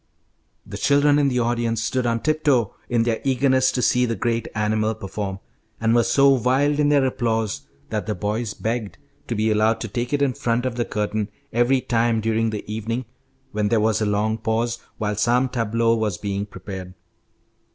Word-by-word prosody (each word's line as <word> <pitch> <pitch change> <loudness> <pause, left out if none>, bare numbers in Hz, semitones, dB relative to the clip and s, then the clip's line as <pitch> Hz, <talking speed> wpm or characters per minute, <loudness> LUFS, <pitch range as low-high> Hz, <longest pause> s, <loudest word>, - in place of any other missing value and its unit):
The - - -7
children 145 +1 +4
in 145 - +3
the 125 -2 0
audience 115 -1 0
stood 130 0 0
on 115 -1 0
tiptoe 145 -8 +1 0.2
in 120 -2 +2
their 115 -1 -1
eagerness 130 0 +3
to 125 - -1
see 125 0 +3
the 115 - -1
great 115 +2 -1
animal 110 0 0
perform, 100 -1 -5 0.4
and 115 0 +2
were 120 - +5
so 140 +4 +4
wild 135 +3 +2
in 145 -1 +3
their 140 -2 +4
applause 110 - -1 0.2
that 105 -2 -2
the 105 - -1
boys 105 +1 -2
begged 110 -2 -3 0.3
to 120 - -2
be 110 +1 +1
allowed 110 +1 +2
to 115 - -3
take 120 +3 -3
it 145 -1 +1
in 135 -2 +1
front 120 +1 -1
of 130 - -1
the 120 0 -1
curtain 105 0 -2 0.2
every 120 +3 +3
time 115 -1 +1
during 110 +1 +1
the 105 -1 -5
evening 115 +3 -3 0.5
when 105 -1 0
there 115 - +3
was 110 +1 +1
a 105 - +1
long 105 +2 0
pause 115 +2 -1 0.2
while 105 -2 -1
some 120 +5 +2
tableau 115 -2 +1
was 110 -5 -1
being 100 0 -3
prepared. 95 -3 -8
115 Hz, 190 wpm, -22 LUFS, 110-125 Hz, 0.5 s, were